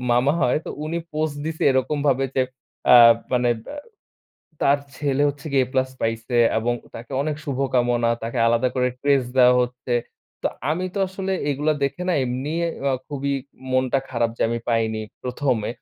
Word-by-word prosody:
মামা 130 +4 +3
হয় 125 - +3
তো - - -4
উনি 165 +2 -2
পোস্ট 155 -1 -1
দিছে 160 0 -4
এরকম 130 +3 +1
ভাবে 135 -1 +3
যে 130 - +3 0.5
আ - - +10 0.4
মানে 125 -1 +3 0.2
বা - - -7 0.9
তার 140 +1 +4 0.2
ছেলে 140 -1 0
হচ্ছে 145 +2 -6
গিয়ে 135 -2 +4
এ - - -15
প্লাস 130 0 +1
পাইছে 115 +2 -2 0.2
এবং 120 +2 0 0.2
তাকে 120 +4 -9
অনেক 150 0 -2
শুভকামনা। 125 -4 +1
তাকে 115 +2 -3
আলাদা 120 +2 +3
করে 125 -1 +2
ক্রেস্ট 140 -3 +2
দেওয়া 125 0 +7
হচ্ছে। 125 0 -4 0.5
তো - - +1 0.2
আমি 180 +4 -1
তো 200 - -2
আসলে 190 0 -3 0.2
এগুলো 150 +2 +1
দেখে 160 +6 -2
না 180 - +3
এমনি 130 +5 -3 0.4
আ - - +1 0.2
খুবই 140 -1 -2 0.4
মনটা 130 +1 +2
খারাপ, 120 -2 0
যে - - +1
আমি 115 - -1
পাইনি। 110 -1 0 0.2
১মে। 125 -3 -1
130 Hz, 170 wpm, -23 LUFS, 120-145 Hz, 0.9 s, আ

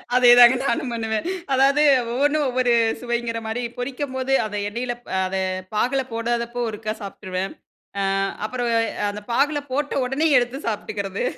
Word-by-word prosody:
அதேதாங்க. 245 0 +8
நானும் 250 0 -1
பண்ணுவேன். 225 +2 -2 0.3
அதாது 275 +3 +4 0.3
ஒவ்வொன்னும் 290 +4 +1
ஒவ்வொரு 250 -1 +2 0.3
சுவைங்கிற 235 -1 -2
மாரி. 225 +3 -3
பொரிக்கும்போது 260 +1 -3
அதை 210 -1 -4
எண்ணெயில 240 +3 -3 0.2
அ - - +2
அத 190 +1 -3 0.4
பாகுல 255 +5 +1
போடாதப்போ 235 +1 -2
ஒருக்கா 215 0 -4
சாப்ட்டுருவன். 190 -1 -5 0.7
ஆ. - - +1 0.2
அப்புறம் 245 +2 -2 0.4
அந்த 210 +1 -6
பாகுல 290 +4 +2
போட்ட 290 +2 -1
உடனே 270 +5 +1
எடுத்து 245 +2 0
சாப்ட்டுக்கிறது. 200 -2 -3
240 Hz, 130 wpm, -22 LUFS, 220-260 Hz, 0.7 s, அதேதாங்க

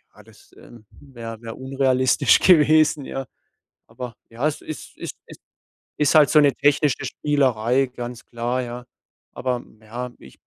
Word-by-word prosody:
ja, - - -15
das, - - -21
ähm, 115 -3 -16
wäre 115 -5 -10
wäre 115 -1 -7
unrealistisch 130 -1 +2
gewesen, 155 -3 +5
ja. 135 0 -5 0.6
Aber 125 -2 -8 0.2
ja, 120 +6 -2
es 150 - -5
ist 155 - -9
ist - - -7
ist - - -14 0.5
ist 150 -2 +2
halt 150 -2 +7
so 150 - +6
'ne 140 -2 +4
technische 145 -2 +1
Spielerei, 130 -3 +1
ganz 125 -1 -8
klar, 120 +2 -2
ja. 120 0 -7 0.5
Aber 125 -1 -3 0.2
ja, 120 +3 -7
ich 65 - -16
130 Hz, 150 wpm, -22 LUFS, 120-145 Hz, 0.6 s, halt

